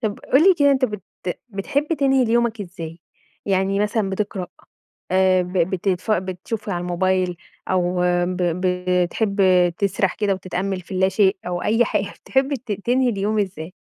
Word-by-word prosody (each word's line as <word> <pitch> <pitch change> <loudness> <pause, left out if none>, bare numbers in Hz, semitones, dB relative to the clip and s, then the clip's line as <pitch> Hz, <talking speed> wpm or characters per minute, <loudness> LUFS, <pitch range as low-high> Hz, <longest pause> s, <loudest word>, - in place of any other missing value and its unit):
طب 215 -4 -2
قُل 270 +4 +6
لي 380 - +7
كده 285 -1 +5
أنت 265 -1 +3
بت 210 -5 -4 0.5
بتحب 240 +9 -2
تنهي 270 -2 +3
اليومك 235 -1 +1
إزاي؟ 170 -3 -8 0.5
يعني 195 +1 +1
مثلًا 210 -1 0
بتقرأ، 190 -2 -3 0.7
آآ 185 0 +4
ب 180 0 -6
بتتـف 185 +3 0
بتشوف 195 +4 -3
على 175 -3 -1
الموبايل، 180 0 0 0.3
أو 180 -1 +1 0.2
ب 180 +1 -3
ب 175 0 -1 0.4
بتحب 200 +3 -1 0.4
تِسرَح 195 -1 0
كده 205 -2 +1
وتتأمّل 185 0 -3
في 175 - -17
اللا 190 0 +2
شيء، 195 -1 +2
أو 175 0 -2
أي 225 +2 +2
حاجة 200 -1 -2
بتحب 270 +1 +1
ت 240 -5 -5
تنهي 245 +5 +1
اليوم 210 0 0
إزاي؟ 185 -3 -4
195 Hz, 160 wpm, -22 LUFS, 185-220 Hz, 0.7 s, لي